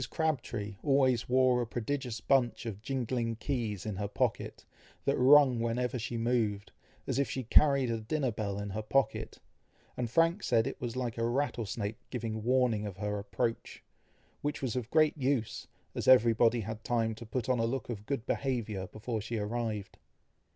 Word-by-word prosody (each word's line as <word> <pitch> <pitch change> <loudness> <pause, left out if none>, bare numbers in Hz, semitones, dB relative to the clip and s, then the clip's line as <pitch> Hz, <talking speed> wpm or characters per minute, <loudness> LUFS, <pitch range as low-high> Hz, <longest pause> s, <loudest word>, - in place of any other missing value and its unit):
Crabtree 120 -10 -2
always 130 -5 +2
wore 130 -1 +4
a 120 - -2
prodigious 120 0 -3
bunch 130 -3 +2
of 105 -3 -5
jingling 120 -2 -2
keys 110 -5 -3
in 105 -3 -3
her 100 0 -2
pocket, 105 - -2 0.4
that - - +2
rung 130 -1 +6
whenever 120 +2 -1
she 115 +1 -3
moved, 115 -4 0 0.3
as - - -1
if 140 - +1
she 130 - -3
carried 135 +1 +4
a 115 -1 -2
dinner 130 +3 -1
bell 100 -2 -3
in 100 0 -4
her 110 +3 -3
pocket, 135 +5 0 0.6
and 120 -2 -2
Frank 165 - +3
said 115 -7 +2
it 135 - -5
was 120 -1 -3
like 120 -3 -3
a - - 0
rattlesnake 115 -5 -2
giving 115 -3 -3
warning 120 -3 +2
of 95 -3 -8
her 105 0 -2
approach, 115 +3 -3 0.6
which 145 0 -2
was 130 -4 -2
of 125 -3 -3
great 155 0 +4
use, 130 -4 -1 0.3
as - - -4
everybody 120 -1 +5
had 110 +1 -6
time 115 -2 0
to 115 - -9
put 115 +1 -3
on 130 -2 +2
a 115 - +2
look 125 +1 -2
of 105 -3 -6
good 135 -5 -2
behaviour 110 -8 -2
before 110 +2 -4
she 115 +2 -4
arrived. 105 -1 -3
120 Hz, 175 wpm, -31 LUFS, 110-130 Hz, 0.6 s, rung